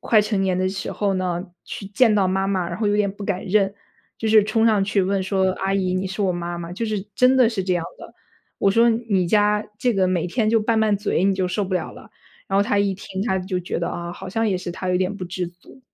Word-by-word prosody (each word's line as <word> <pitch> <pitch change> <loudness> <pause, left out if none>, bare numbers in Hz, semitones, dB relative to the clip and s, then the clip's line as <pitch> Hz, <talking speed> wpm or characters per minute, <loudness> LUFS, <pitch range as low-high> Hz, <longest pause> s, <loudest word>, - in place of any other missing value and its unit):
快 215 -2 +4
成 210 -1 -1
年 185 -1 0
的 185 - +1
时 190 0 -4
候 200 -2 -1
呢， 180 -2 -1 0.2
去 195 - -7
见 220 +3 +3
到 200 -2 +3
妈 190 +1 0
妈， 185 -3 -1
然 170 - -5
后 215 0 0
有 205 - +2
点 205 -1 +2
不 205 - -10
敢 190 -2 -2
认， 195 0 +2 0.5
就 225 - -3
是 215 -1 +6
冲 220 +2 +2
上 215 -3 +3
去 200 0 +1
问 195 +1 0
说 190 0 +1
阿 195 +1 -2
姨， 185 -2 0
你 185 - -1
是 195 +2 -5
我 190 -2 +2
妈 175 0 -4
吗？ 170 0 -6
就 230 +5 -3
是 215 -2 -2
真 255 +3 +4
的 250 -3 +5
是 210 -5 -2
这 185 -1 0
样 170 -1 -1
的。 - - -12 0.5
我 - - +3
说 235 +2 +5
你 225 -5 0
家 210 +1 +3
这 245 -1 +1
个 190 -1 +2
每 175 -2 0
天 215 +4 0
就 225 -1 +3
拌 220 +1 +1
拌 215 -2 +3
嘴， 200 -3 -1
你 195 - +4
就 185 -1 0
受 185 +3 -1
不 190 - -6
了 - - -2
了。 - - -14 0.4
然 195 0 +2
后 - - +5
他 205 -2 0
一 200 -1 +2
听 190 0 -5
他 190 -4 0
就 185 0 -3
觉 175 - -3
得 170 - -2
啊， 170 0 -5
好 185 - -8
像 225 +3 0
也 185 -2 0
是 175 -1 -5
他 185 - -5
有 180 - +2
点 185 +2 -1
不 185 - -5
知 180 0 -3
足。 175 +8 -16
195 Hz, 295 characters per minute, -22 LUFS, 185-210 Hz, 0.5 s, 是